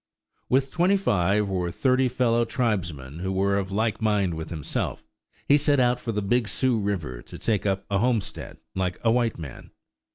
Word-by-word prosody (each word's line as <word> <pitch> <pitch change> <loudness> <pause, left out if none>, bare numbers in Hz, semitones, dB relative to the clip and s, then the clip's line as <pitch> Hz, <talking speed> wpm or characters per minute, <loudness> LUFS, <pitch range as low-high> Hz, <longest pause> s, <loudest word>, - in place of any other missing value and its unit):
With 135 +1 +2
twenty 180 +3 +3
five 100 - +1
or 90 -2 -1
thirty 130 +7 +2
fellow 120 -1 +2
tribesmen 85 - -2
who 95 +2 -2
were 100 +1 +1
of 95 0 -4
like 110 +3 0
mind 105 -5 +2
with 80 0 -5
himself, 80 -5 -3 0.4
he 145 - +6
set 145 -1 +3
out 125 0 +3
for 115 - -3
the 105 -2 -2
Big 115 +3 +1
Sioux 120 +3 +1
River 85 - -3
to - - -11
take 105 -3 0
up 95 0 -1
a 100 -1 0
homestead 120 -2 -1 0.2
like 90 -1 -1
a 115 - +4
white 120 -1 +1
man. 75 -6 -9
105 Hz, 185 wpm, -25 LUFS, 95-125 Hz, 0.4 s, he